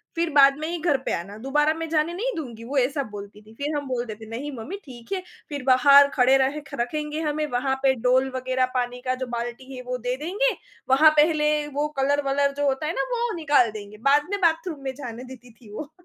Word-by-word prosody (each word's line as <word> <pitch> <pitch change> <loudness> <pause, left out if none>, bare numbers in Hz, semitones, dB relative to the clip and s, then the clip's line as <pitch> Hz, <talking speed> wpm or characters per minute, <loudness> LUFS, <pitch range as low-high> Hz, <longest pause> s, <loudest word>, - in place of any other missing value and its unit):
फिर 335 0 0
बाद 275 -1 +6
में 310 - -3
ही 345 - -3
घर 305 -4 +2
पे - - -1
आना 200 +5 -9
दोबारा 295 +3 +2
मैं 325 0 -5
जाने 320 +1 +1
नहीं 480 +8 -2
दूँगी 240 -8 -7
वो 270 +5 -4
ऐसा 275 +2 +1
बोलती 205 0 -9
थी। 215 +1 -17
फिर 295 +2 -1
हम 285 -2 -3
बोलते 240 -4 -3
थे 220 - -12
नहीं 275 +6 -5
मम्मी 245 - -6
ठीक 240 0 -13
है, 375 - -2 0.3
फिर 285 -3 -5
बाहर 280 +2 +7
खड़े 260 +1 +5
रहे 270 +3 0
ख - - -16
रखेंगे 300 +4 -3
हमें 305 0 -1
वहाँ 265 +2 0
पे 265 -1 +5
डोल 260 +1 +3
वग़ैरह 255 0 0
पानी 245 0 -2
का 255 0 0
जो - - -4
बाल्टी 240 +2 -5
है 255 - -7
वो 250 - -2
दे 250 +1 -2
देंगे। 435 +9 +1 0.4
वहाँ 295 +4 +7
पहले 300 0 +4 0.2
वो 295 +1 -1
कलर 285 +2 +2
वलर 280 0 +1
जो 290 - 0
होता 270 +3 0
है 325 - -1
ना, - - -1
वो 475 -1 -1
निकाल 285 -8 +3
देंगे 210 0 -9
बाद 290 +1 +4
में 405 - -1
बाथरूम 330 -2 +1
में 265 -1 -3
जाने 245 -3 -7
देती 250 -2 -12
थी 220 -2 -17
वो। 300 +6 -7
275 Hz, 235 wpm, -24 LUFS, 250-300 Hz, 0.4 s, बाहर